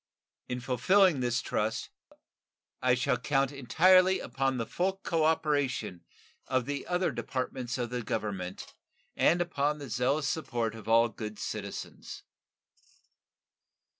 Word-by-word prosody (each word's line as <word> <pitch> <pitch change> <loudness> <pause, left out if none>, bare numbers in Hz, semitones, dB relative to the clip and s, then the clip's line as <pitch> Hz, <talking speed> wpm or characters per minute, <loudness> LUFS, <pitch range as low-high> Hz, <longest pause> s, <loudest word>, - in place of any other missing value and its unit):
In 125 - -2
fulfilling 160 - +3
this 125 0 0
trust 110 +1 -2 0.9
I 125 -1 +4
shall 125 0 0
count 135 +1 +1
entirely 185 +7 +4
upon 135 -1 -1
the 115 - -2
full 185 +10 0
cooperation 150 - 0 0.4
of 130 -2 0
the 140 0 -4
other 180 -1 +1
departments 125 0 -3
of 120 -2 -3
the 125 0 -2
Government 100 -5 -4 0.4
and 175 +2 +3
upon 150 -4 0
the 140 -5 -8
zealous 135 +5 +1
support 120 -8 -2
of 110 -2 -11
all 115 +1 +5
good 110 -1 -7
citizens. - - -6
130 Hz, 120 wpm, -30 LUFS, 120-155 Hz, 0.9 s, all